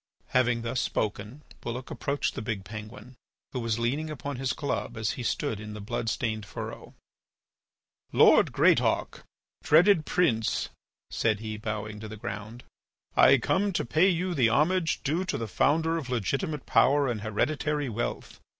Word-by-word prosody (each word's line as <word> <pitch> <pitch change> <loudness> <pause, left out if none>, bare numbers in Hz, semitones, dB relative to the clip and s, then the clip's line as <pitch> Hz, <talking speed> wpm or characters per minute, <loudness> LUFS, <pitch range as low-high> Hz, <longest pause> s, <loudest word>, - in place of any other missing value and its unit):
Having 120 -2 +2
thus 120 +2 -1
spoken, 110 +6 -3 0.2
Bulloch 120 +2 -5
approached 140 +1 -2
the - - -5
big 105 -3 -3
penguin, 110 +3 -9 0.4
who 130 - -3
was 115 -2 -1
leaning 135 +7 -1
upon 145 -2 -5
his 130 0 -1
club 115 -8 -3
as 110 -2 0
he - - -6
stood 110 -2 -1
in 105 0 -7
the - - -7
blood 115 +2 -3
stained 110 -2 -2
furrow: 95 -5 -8 1.2
"Lord - - +6
Greatauk, - - +2 0.4
dreaded 165 +1 +5
Prince," 115 -11 +1 0.4
said 110 -3 +1
he, 110 -1 -5
bowing 105 0 -5
to 110 - -7
the 110 0 -8
ground, 105 +4 -7 0.5
"I - - +7
come 200 +1 +1
to - - -1
pay 160 +10 +4
you 180 0 0
the 125 -7 +3
homage 165 +6 +1
due 160 +6 0
to 145 - -2
the 115 -3 -4
founder 160 +9 +2
of 135 -6 -8
legitimate 135 - -2
power 140 +2 +4
and 115 -4 -2
hereditary 145 +7 -1
wealth. 120 0 -4
120 Hz, 160 wpm, -28 LUFS, 110-150 Hz, 1.2 s, I